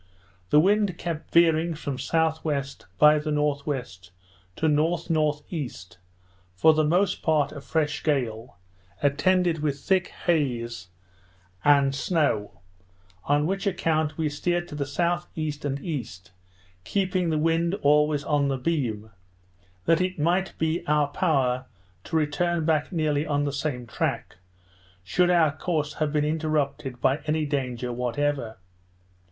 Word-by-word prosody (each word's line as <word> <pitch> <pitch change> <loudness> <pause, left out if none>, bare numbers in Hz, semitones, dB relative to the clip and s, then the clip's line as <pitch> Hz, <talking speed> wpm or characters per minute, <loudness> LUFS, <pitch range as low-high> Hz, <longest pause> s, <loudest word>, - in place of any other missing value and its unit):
The 150 - +6
wind 200 +1 +2
kept 165 -3 -5
veering 165 0 +3
from 145 -2 -4
S.W. 160 -3 0 0.3
by 150 0 +6
the 150 +1 -4
N.W. 145 -2 0 0.7
to - - -2
N.N.E. 155 -2 0 0.9
for 160 +12 +5
the 155 0 +2
most 180 +5 +1
part 155 -3 +2
a 145 - -8
fresh 150 0 -1
gale, 120 - -2 0.5
attended 170 +4 +2
with 150 -2 0
a - - -16
thick 185 +4 +1
haze 120 - -2 0.8
and 140 -2 +4
snow; 135 - -1 0.6
on 145 +1 +2
which 195 +4 -1
account 160 -5 0
we 160 -1 0
steered 175 +4 -1
to - - -9
the 145 -1 -2
S.E. 170 0 -2
and 140 -1 -2
E., 145 - -3 0.8
keeping 185 - 0
the 155 - +1
wind 165 +3 +1
always 150 0 +3
on 145 -2 +1
the 135 -1 -1
beam, 125 -7 -2 0.7
that 165 +1 +3
it 185 0 -1
might 175 +5 0
be 160 +1 0
in - - -18
our 150 -1 +2
power 130 -6 0 0.4
to - - -5
return 160 +2 0
back 155 -2 +1
nearly 155 -3 0
on 145 -1 +1
the 145 -1 -2
same 135 -3 -3
track, 110 - -3 0.7
should 175 - +2
our 160 -4 +3
course 155 -3 -2
have 155 -1 +1
been 150 -1 +1
interrupted 150 -5 -1
by 135 +3 +2
any 155 0 +1
danger 125 -4 -2
whatever. 125 -1 -2
150 Hz, 135 wpm, -25 LUFS, 140-165 Hz, 0.9 s, The